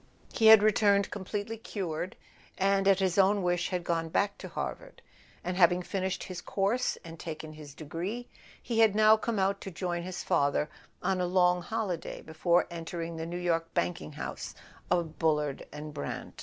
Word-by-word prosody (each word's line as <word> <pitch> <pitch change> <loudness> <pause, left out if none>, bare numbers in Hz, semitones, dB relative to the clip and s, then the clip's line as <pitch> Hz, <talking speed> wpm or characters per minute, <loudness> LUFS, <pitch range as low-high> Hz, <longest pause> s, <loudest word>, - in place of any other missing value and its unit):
He 220 - +4
had 220 -2 +10
returned 200 -2 +3
completely 205 +3 -4
cured, 180 -5 -4 0.4
and 195 0 +2
at 195 -1 +6
his 190 -1 +1
own 195 +1 +4
wish 175 0 +1
had 180 -2 -2
gone 165 -1 -1
back 200 +4 +1
to - - -7
Harvard; - - -6 0.4
and 180 +1 -2
having 180 0 +4
finished 190 0 -2
his 180 -2 -6
course 205 +8 0
and 165 -1 -9
taken 155 -1 -6
his 150 -2 -11
degree, 180 +11 -5 0.4
he 230 -2 -1
had 220 -3 +5
now 215 0 +7
come 220 0 -2
out 195 +1 +1
to - - -5
join 175 -1 -3
his 180 +1 -5
father 145 +1 +1 0.3
on 190 -1 +1
a 180 - +1
long 180 0 +3
holiday 200 -3 -3
before 170 +2 +2
entering 170 0 -5
the 160 0 -4
New 175 +1 -4
York 165 -2 0
banking 175 -3 -1
house 150 - -6 0.3
of 170 -3 0
Bullard 150 -3 0
and 150 +1 -7
Brant. 145 - -6
180 Hz, 175 wpm, -30 LUFS, 165-200 Hz, 0.4 s, had